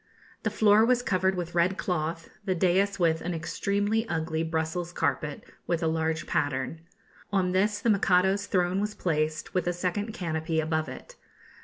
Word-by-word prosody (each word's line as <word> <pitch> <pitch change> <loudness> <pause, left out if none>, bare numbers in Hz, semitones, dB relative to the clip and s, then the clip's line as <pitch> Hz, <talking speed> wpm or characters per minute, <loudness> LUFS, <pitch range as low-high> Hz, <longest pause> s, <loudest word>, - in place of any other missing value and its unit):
The - - 0
floor 215 0 +5
was 245 +1 +3
covered 190 -2 +1
with 175 -1 -4
red 175 +3 +2
cloth; 165 -1 -2
the 190 -2 0
daïs 190 +3 +2
with 165 -3 +2
an 175 0 -3
extremely 205 +7 -1
ugly 160 0 -1
Brussels 165 +2 -2
carpet, 150 -4 -1 0.2
with 170 -1 0
a - - +2
large 160 0 0
pattern. 145 +3 -1 0.5
On 190 -2 +1
this 205 +3 +2
the 230 - 0
Mikado's 195 0 +3
throne 180 +1 +1
was 210 0 -2
placed, 155 -2 -1
with 180 -2 0
a 175 - +1
second 185 +5 -2
canopy 160 -5 -2
above 155 -2 -1
it. 130 - -10
175 Hz, 165 wpm, -28 LUFS, 160-195 Hz, 0.5 s, floor